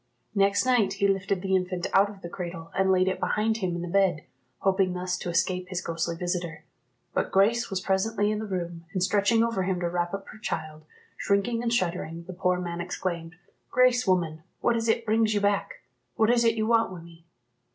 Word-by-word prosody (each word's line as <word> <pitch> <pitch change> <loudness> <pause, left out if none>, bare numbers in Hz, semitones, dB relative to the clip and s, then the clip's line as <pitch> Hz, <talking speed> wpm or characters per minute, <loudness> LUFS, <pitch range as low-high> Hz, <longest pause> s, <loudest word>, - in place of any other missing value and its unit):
Next 200 +2 +3
night 235 -7 +3
he 200 0 +1
lifted 195 -1 0
the 190 0 +1
infant 180 -1 -1
out 200 +1 +5
of 200 -1 -12
the - - -4
cradle, 170 -2 -7
and 190 0 +3
laid 185 0 +3
it 190 - 0
behind 220 +1 +1
him 185 -5 -2
in 175 - -4
the - - -4
bed, 180 -4 +2 0.4
hoping 190 -1 +2
thus 180 0 -2
to - - -4
escape 180 +1 0
his 185 -2 -2
ghostly 170 -1 -2
visitor; 175 -1 -3 0.5
but - - -1
Grace 220 +5 +3
was 190 -2 -2
presently 205 +2 +1
in 215 - -1
the 220 - -4
room, 170 -3 -4
and 185 - 0
stretching 210 +4 +3
over 230 -4 0
him 185 -1 -1
to 175 - -1
wrap 175 0 -1
up 195 0 -8
her 220 - -12
child. 155 -6 -5 0.3
Shrinking 230 +4 +1
and 235 -1 -1
shuddering, 170 -6 -1
the 185 +2 -8
poor 180 0 +1
man 175 -1 -4
exclaimed, 175 -1 -4 0.3
"Grace, 250 -2 +3
woman, 170 -4 +1 0.2
what 235 - +2
is 230 0 0
it 230 +1 +1
brings 220 0 +2
you - - +3
back? 200 0 -1 0.3
What 220 +1 +3
is 240 -1 +3
it 230 -1 +3
you 215 -1 0
want 230 -2 +3
wi' 180 -2 -8
me?" 165 0 -16
190 Hz, 215 wpm, -27 LUFS, 175-215 Hz, 0.5 s, out